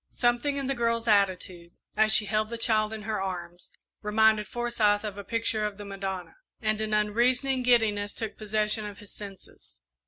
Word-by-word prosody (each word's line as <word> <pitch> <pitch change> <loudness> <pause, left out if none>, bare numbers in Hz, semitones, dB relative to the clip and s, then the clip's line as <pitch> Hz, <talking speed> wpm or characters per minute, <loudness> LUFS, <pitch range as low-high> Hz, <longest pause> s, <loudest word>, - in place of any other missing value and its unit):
Something 245 +4 +1
in 275 - -2
the 275 - 0
girl's 230 -2 0
attitude, 185 -4 +1 0.2
as 215 0 +4
she 215 - +6
held 215 +1 0
the 235 - -4
child 215 -2 +2
in 220 -1 -5
her 215 -2 -2
arms, 175 -2 -6 0.3
reminded 215 0 +3
Forsyth 225 -3 +1
of 210 -2 -4
a 200 - -7
picture 225 0 -1
of 210 -2 -3
the 205 - -8
Madonna, 195 -2 -5 0.2
and 215 -1 0
an 215 0 -2
unreasoning 245 +5 +2
giddiness 220 -4 +2
took 220 -2 -5
possession 215 0 0
of 205 -1 -9
his 205 -1 -12
senses. 200 - -11
215 Hz, 180 wpm, -27 LUFS, 205-230 Hz, 0.3 s, she